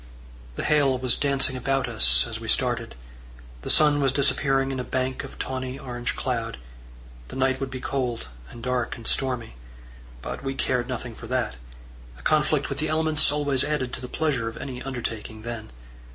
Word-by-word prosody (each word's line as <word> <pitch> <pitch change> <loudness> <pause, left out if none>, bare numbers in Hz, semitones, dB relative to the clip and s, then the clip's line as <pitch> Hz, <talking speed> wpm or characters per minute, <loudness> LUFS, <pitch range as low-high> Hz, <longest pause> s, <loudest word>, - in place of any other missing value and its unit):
The - - -3
hail 140 -4 +4
was 125 -1 +2
dancing 140 -2 +2
about 135 +1 0
us 115 -3 +5
as 115 -1 -5
we 115 - -7
started; 115 - 0 0.7
the - - -5
sun 150 -1 +5
was 135 -2 +4
disappearing 135 0 +2
in 130 - -2
a - - -1
bank 130 +1 -1
of - - -9
tawny 130 0 -3
orange 120 -2 -3
cloud; 115 - -2 0.7
the - - -9
night 130 0 +2
would 135 -1 -2
be 130 0 -5
cold 125 - -2 0.2
and 115 - -10
dark 125 -1 -1
and 115 - -11
stormy; 125 - 0 0.7
but - - -5
we 135 0 -2
cared 125 -2 0
nothing 125 -2 -4
for 115 - -9
that: 125 - -1 0.6
a - - -14
conflict 150 - +3
with 140 - -4
the 155 0 0
elements 155 -2 +3
always 145 -3 +2
added 145 -4 -1
to - - -4
the 125 - -5
pleasure 135 -6 0
of 115 - -10
any 130 -2 -5
undertaking 115 -4 -5
then. 115 -2 -5
130 Hz, 180 wpm, -26 LUFS, 120-135 Hz, 0.7 s, us